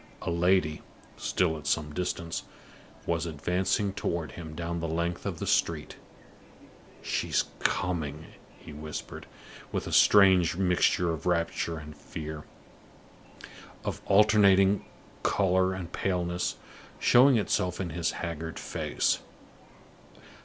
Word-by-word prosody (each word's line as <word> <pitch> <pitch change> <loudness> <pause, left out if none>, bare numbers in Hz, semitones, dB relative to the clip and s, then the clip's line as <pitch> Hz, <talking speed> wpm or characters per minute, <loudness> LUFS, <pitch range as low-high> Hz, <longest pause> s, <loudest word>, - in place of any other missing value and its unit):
A - - -2
lady, 85 -2 +2 0.3
still 80 -4 0
at 75 - -9
some 75 -2 0
distance, 85 -1 -3 0.6
was 85 0 -1
advancing 90 +6 0
toward 85 -6 -3
him 80 +1 -8
down 85 +1 -3
the 85 - -2
length 85 +2 -2
of - - -3
the - - -4
street. - - 0 1.1
"She's - - 0 0.2
coming!" 80 -4 -1 0.3
he 75 - -12
whispered, 75 0 -7 0.4
with - - -2
a - - -5
strange 95 -5 +6
mixture 90 -2 +2
of 80 +2 -5
rapture 85 -1 0
and 75 0 -9
fear, 75 +1 -7 1.4
of - - -3
alternating 100 -1 +5 0.4
color 95 -1 +2
and 95 -3 -6
paleness, 90 -2 -1 0.4
showing 130 +1 +6
itself 90 -4 0
in 90 -3 -3
his 85 +1 -1
haggard 80 -1 -5
face. - - -1
85 Hz, 115 wpm, -28 LUFS, 80-95 Hz, 1.4 s, strange